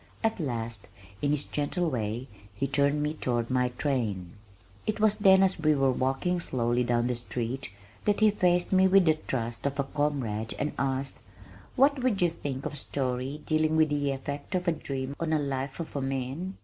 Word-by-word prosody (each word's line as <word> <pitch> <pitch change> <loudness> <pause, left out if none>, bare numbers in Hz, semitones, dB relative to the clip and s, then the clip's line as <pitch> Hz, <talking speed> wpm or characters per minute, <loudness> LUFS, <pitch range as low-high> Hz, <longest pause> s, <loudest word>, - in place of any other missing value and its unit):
At 225 -2 +1
last, 115 - -3 0.3
in 145 - +1
his 145 0 +1
gentle 170 +4 -1
way, 120 -2 -2 0.3
he 120 - -1
turned 140 +2 +2
me 150 +1 0
toward 120 -5 -1
my 125 -1 +2
train. 115 - -2 0.6
It 215 0 -1
was 215 0 +3
then 190 -1 +7
as 190 -1 +2
we 155 -1 +3
were 135 -1 +3
walking 135 +8 0
slowly 120 -5 +1
down 120 -1 +1
the 125 - +1
street, 120 0 -4 0.3
that 205 -1 +2
he 215 -1 +6
faced 180 -3 +2
me 190 0 +5
with 190 -1 +5
the 160 - +5
trust 120 -5 -3
of 140 0 -4
a - - +3
comrade 135 -7 -2
and 145 +1 -1
asked, 135 0 -1 0.6
"What 275 +1 +4
would 245 -6 +1
you 175 -2 +3
think 140 -5 -5
of - - -3
a - - -6
story 135 +1 -3
dealing 155 0 +2
with 155 -1 +4
the 145 -1 0
effect 140 +5 -4
of 180 0 -1
a - - +5
dream 140 -3 -4
on 165 - -1
the 160 - +3
life 135 -1 -3
of 165 - -6
a 140 - -1
man? 135 +8 -3
140 Hz, 200 wpm, -28 LUFS, 130-165 Hz, 0.6 s, then